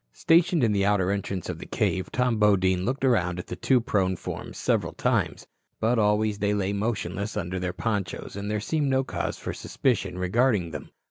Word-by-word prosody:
Stationed 165 - +3
in 115 - +3
the 100 -1 +1
outer 100 -2 +2
entrance 100 -2 -3
of - - -5
the - - -8
cave, 95 - -1
Tom 125 -3 +1
Bodine 95 -3 +3
looked 135 +2 -1
around 90 -9 +2
at 90 - -5
the - - -6
two 130 +6 +3
prone 95 -5 0
forms - - -7
several - - 0
times. - - 0 0.3
But 115 +2 +2
always 105 0 +2
they 105 0 +1
lay 100 0 0
motionless 100 -1 -2
under 90 -1 -2
their 90 0 -2
ponchos, 95 -1 -3
and 100 +1 -4
there 105 0 0
seemed 145 +6 0
no 135 0 +2
cause - - -3
for - - -5
suspicion 100 -8 -1
regarding 95 -1 +1
them. 75 - -7
105 Hz, 195 wpm, -26 LUFS, 95-115 Hz, 0.3 s, Stationed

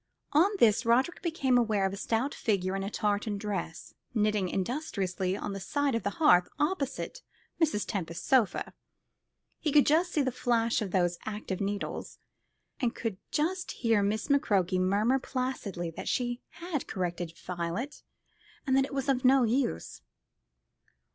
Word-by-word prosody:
On 325 +7 +6
this 220 - +4
Roderick 255 +8 +2
became 275 -7 +2
aware 215 -4 +2
of 190 - -1
a - - -3
stout 230 +7 -1
figure 190 -3 0
in 195 - -2
a 195 - -3
tartan 210 0 -1
dress, 195 -5 -4 0.2
knitting 210 -3 +2
industriously 190 - -2
on 205 - -4
the 195 - -5
side 285 +6 0
of 230 - 0
the - - -1
hearth 180 - +5
opposite 300 - -2 0.4
Mrs. 295 -11 +2
Tempest's 170 -6 -4
sofa. 235 -9 +2 0.9
He 305 - 0
could 290 0 +6
just 335 +4 +3
see 295 - +2
the 260 - 0
flash 235 -2 +1
of 205 - -2
those 175 -1 +1
active 210 -3 -4
needles, 200 +1 -3 0.6
and 245 -2 0
could 225 -5 -3
just 355 +5 -1
hear 225 -3 +2
Miss 210 +2 0
McCroke 195 - +2
murmur 205 +8 +2
placidly 250 -11 -3
that - - -7
she 245 0 -1
had 335 -5 -4
corrected 175 -3 -3
Violet, 180 - -4 0.6
and 265 -2 +2
that 270 0 +4
it 275 - -7
was 270 0 -2 0.2
no 260 0 +6
use. 235 - -1
225 Hz, 155 wpm, -29 LUFS, 195-270 Hz, 0.9 s, On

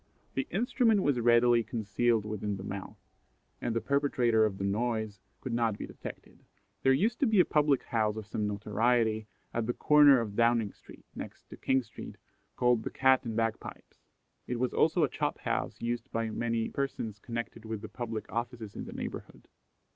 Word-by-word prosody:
The 135 - -2
instrument 225 0 +2
was 140 -4 +2
readily 120 0 +5
concealed 115 0 0
within 105 -1 -3
the 95 - -7
mouth, 100 0 -6 0.6
and 115 - -1
the 115 - +1
perpetrator 130 -6 +2
of 95 -2 -6
the 95 - -4
noise 110 0 -1 0.2
could 130 - -4
not 115 -3 +1
be - - -5
detected. - - -10 0.4
There 135 - +4
used 210 - +2
to 275 - +3
be 220 -3 +3
a 180 - +7
public 145 -3 +2
house 110 -2 0
of 110 - -5
some 105 +1 -2
notoriety 110 +1 +1 0.3
at 115 -1 -1
the 120 - -1
corner 145 -3 +6
of 105 -3 -4
Downing 115 -3 +2
street, - - -16
next - - -9
to - - -7
King 130 -1 +1
street, - - -10 0.4
called 125 -2 +3
the - - -4
"Cat 130 -1 +3
and 115 -2 -3
Bagpipes." 115 -1 -3 0.5
It 120 -1 -2
was 125 0 0
also 160 +1 +3
a - - +4
chop - - -2
house - - -2
used 120 0 -3
by 115 -1 -1
many 115 0 -1
persons 115 -6 -3
connected 115 0 -5
with 110 -2 -5
the - - -5
public 115 -3 -5
offices 115 -3 -4
in - - -5
the - - -8
neighbourhood. - - -7
115 Hz, 185 wpm, -30 LUFS, 110-130 Hz, 0.6 s, a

